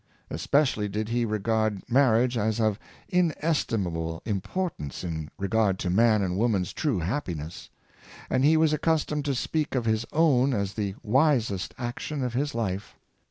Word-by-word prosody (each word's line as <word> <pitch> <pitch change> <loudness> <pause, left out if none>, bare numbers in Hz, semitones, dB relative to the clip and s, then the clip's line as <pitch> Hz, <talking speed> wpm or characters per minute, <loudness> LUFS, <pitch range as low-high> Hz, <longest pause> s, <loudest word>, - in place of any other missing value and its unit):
Especially 105 - +1
did 105 +2 -3
he 120 0 +1
regard 110 -1 -1
marriage 125 -1 +3
as 110 0 0
of 110 -2 +1 0.3
inestimable 115 - 0
importance 100 - -3
in 80 -3 -4
regard 100 0 +1
to 90 - -2
man 110 +1 +4
and 90 0 -1
woman's 105 -6 +1
true 145 -9 0
happiness; 85 - -4 0.6
and 130 0 +1
he 155 +3 +5
was 160 -1 +3
accustomed 150 -1 0
to 140 -2 0
speak 150 +3 -1
of 125 -3 0
his 110 0 +1
own 140 -5 +3
as 100 -1 -2
the 100 -3 -3
wisest 120 - +1
ac 120 -1 -2
tion 150 -3 -3
of 125 -2 -2
his 140 +2 -1
life. 100 -4 -3
115 Hz, 155 wpm, -27 LUFS, 100-140 Hz, 0.6 s, he